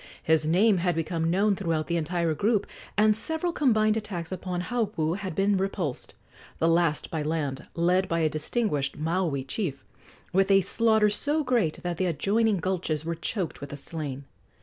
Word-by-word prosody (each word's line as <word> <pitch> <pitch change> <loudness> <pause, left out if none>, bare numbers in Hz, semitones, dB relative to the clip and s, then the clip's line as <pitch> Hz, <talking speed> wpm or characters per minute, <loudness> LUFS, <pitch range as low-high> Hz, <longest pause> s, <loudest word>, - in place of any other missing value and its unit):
His 160 -1 +2
name 195 +5 +4
had 175 -1 0
become 165 0 -1
known 200 +4 +2
throughout 165 -5 -1
the 170 - -2
entire 170 0 0
group, 205 +6 +1 0.3
and 215 0 +5
several 320 +9 -2
combined 220 -9 +3
attacks 190 -6 -4
upon 180 -1 -3
Haupu 195 -8 -1
had 190 -5 -5
been 195 0 +2
repulsed 190 -8 -3 0.4
the 165 - +2
last 165 -2 +1
by 160 - -2
land, 150 -3 -2
led 180 +3 +2
by 165 0 0
a 160 - +3
distinguished 155 - -1
Maui 160 -3 -1
chief, 140 -1 -4 0.5
with 195 +1 +3
a 195 0 +6
slaughter 220 +2 +3
so 295 +8 +1
great 235 - 0
that 175 -2 -2
the 185 - +1
adjoining 205 +6 +1
gulches 170 -4 -2
were 170 - -1
choked 170 +1 -3
with 140 - -6
the 145 - -7
slain. 145 -3 -6
175 Hz, 170 wpm, -27 LUFS, 160-205 Hz, 0.5 s, a